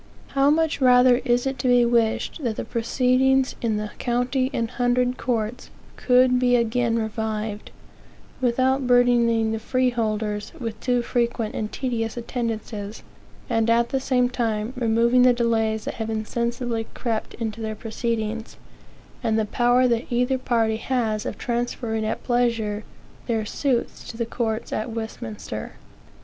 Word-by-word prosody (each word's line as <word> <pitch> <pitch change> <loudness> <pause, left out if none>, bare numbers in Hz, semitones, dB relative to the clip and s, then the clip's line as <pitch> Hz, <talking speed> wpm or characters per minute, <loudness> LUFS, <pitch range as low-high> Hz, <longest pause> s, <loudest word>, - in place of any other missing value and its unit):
How 275 0 +3
much 320 0 +1
rather 250 -1 +6
is 245 0 +2
it 265 -1 -2
to 255 - -1
be 245 -1 +5
wished 235 +4 +1
that 230 -3 -1
the - - -4
proceedings 255 +3 +2
in 225 -3 0
the 210 0 -4
county 250 +2 0
and 230 -5 -1
hundred 245 +1 +1
courts 235 -1 -2 0.3
could 250 0 +4
be 245 -1 +3
again 235 0 +1
revived, 220 -1 -3 0.7
without 255 +2 +2
burdening 240 -2 +4
the 220 - -2
freeholders 220 -4 -1
with 225 -3 -5
too 245 -1 +1
frequent 235 -2 -1
and 215 -1 -3
tedious 235 -3 -2
attendances; 225 -3 -4 0.4
and 225 -2 +1
at 235 +1 +3
the 270 - 0
same 255 -2 +2
time 230 -2 -2
removing 235 +1 +3
the 250 0 +6
delays 225 -2 0
that - - -3
have 220 - -2
insensibly 235 +1 -2
crept 225 -3 -3
into 225 -1 -4
their 220 -1 -3
proceedings, 225 0 -3 0.6
and 225 -3 +1
the 220 - +1
power 245 +3 +3
that 235 0 0
either 250 +2 +1
party 225 -3 +1
has 220 -3 -1
of - - -5
transferring 235 -2 -2
at 215 - -3
pleasure 230 -4 0 0.4
their 225 -3 0
suits 255 +2 -2
to 225 - -8
the 235 - -1
courts 225 -1 -3
at 215 +3 -2
Westminster! 220 - -6
235 Hz, 145 wpm, -24 LUFS, 220-250 Hz, 0.7 s, rather